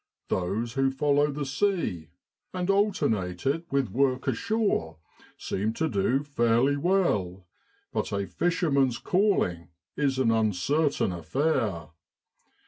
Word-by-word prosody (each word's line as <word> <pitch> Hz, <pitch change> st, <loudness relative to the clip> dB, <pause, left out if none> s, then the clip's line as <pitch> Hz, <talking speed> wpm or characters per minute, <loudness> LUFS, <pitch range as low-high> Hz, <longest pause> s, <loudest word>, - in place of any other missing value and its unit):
Those 100 Hz, +6 st, -1 dB
who 135 Hz, +1 st, +2 dB
follow 145 Hz, +2 st, +2 dB
the 145 Hz, 0 st, -3 dB
sea, 135 Hz, -, -1 dB, 0.5 s
and 180 Hz, +1 st, 0 dB
alternate 110 Hz, -, 0 dB
it 165 Hz, +5 st, 0 dB
with 135 Hz, -7 st, 0 dB
work 130 Hz, +2 st, +1 dB
ashore, 215 Hz, -, 0 dB, 0.4 s
seem 105 Hz, +3 st, -2 dB
to 160 Hz, +6 st, -1 dB
do 125 Hz, +4 st, +1 dB
fairly 125 Hz, -1 st, +2 dB
well; 125 Hz, -, 0 dB, 0.5 s
but -, -, -2 dB
a 100 Hz, -1 st, -1 dB
fisherman's 140 Hz, -, +1 dB
calling 180 Hz, -, +1 dB, 0.3 s
is 140 Hz, -2 st, 0 dB
an 125 Hz, -4 st, +2 dB
uncertain 115 Hz, -, +1 dB
affair. 90 Hz, -, -1 dB
135 Hz, 115 wpm, -27 LUFS, 100-155 Hz, 0.5 s, who